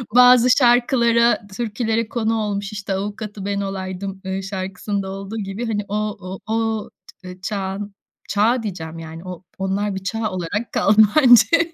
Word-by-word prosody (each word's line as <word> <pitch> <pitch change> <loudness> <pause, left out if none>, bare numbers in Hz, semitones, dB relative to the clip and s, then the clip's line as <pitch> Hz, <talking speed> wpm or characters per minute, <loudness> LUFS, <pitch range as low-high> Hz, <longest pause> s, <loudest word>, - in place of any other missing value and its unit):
bazı 250 0 +7
şarkılara 240 -3 +3
türkülere 225 -1 -1
konu 225 -1 0
olmuş, 205 -1 -3
işte 200 -2 -4
avukatı 205 0 -5
ben 200 0 -1
olaydım, 190 0 -5
ııı, 190 0 -3
şarkısında 195 +1 -4
olduğu 195 +3 -6
gibi 205 +3 -4
hani 210 -2 -2
o 205 - -2 0.5
o 220 - -2
o 225 -1 -1 0.5
çağın 200 0 -4 0.3
çağ 225 +4 +2
diyeceğim 165 -5 -6
yani 165 +1 -9
o 185 0 -8
onlar 195 +1 -1
bir 190 - -6
çağ 220 +1 -2
olarak 185 +5 -3
kaldı 215 +2 +4 0.2
bence, 305 +6 +6
205 Hz, 145 wpm, -21 LUFS, 195-225 Hz, 0.5 s, bazı